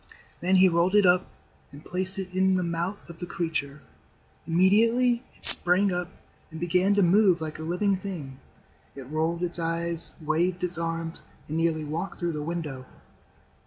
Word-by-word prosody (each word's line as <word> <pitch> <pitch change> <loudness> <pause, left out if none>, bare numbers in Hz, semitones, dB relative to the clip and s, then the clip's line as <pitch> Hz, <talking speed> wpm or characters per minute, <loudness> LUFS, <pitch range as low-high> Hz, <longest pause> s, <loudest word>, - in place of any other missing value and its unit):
Then 185 +2 +1
he 185 0 +6
rolled 175 +2 +1
it 205 -2 +5
up 180 +1 +3 0.4
and 145 +2 -14
placed 185 +2 -2
it 190 -1 -5
in 190 0 +2
the 185 - 0
mouth 170 +4 -4
of 170 -1 -13
the 175 - -6
creature. 150 -5 -4 0.6
Immediately 230 +8 +2 0.2
it - - +1
sprang 180 +2 +8
up 180 0 -3 0.4
and 160 - -9
began 180 +4 +1
to 200 - +3
move 185 0 +3
like 160 -1 -6
a - - -6
living 180 +5 0
thing. 160 -9 -8 0.6
It 135 -2 -10
rolled 165 +3 -2
its 175 0 -2
eyes, 165 0 -4
waved 170 +4 -1
its 180 -1 -4
arms, 165 0 -4 0.3
and 155 - -5
nearly 165 -2 -1
walked 170 +5 -5
through 175 -2 -2
the 150 - -5
window. 150 -5 -6
175 Hz, 170 wpm, -26 LUFS, 165-185 Hz, 0.6 s, sprang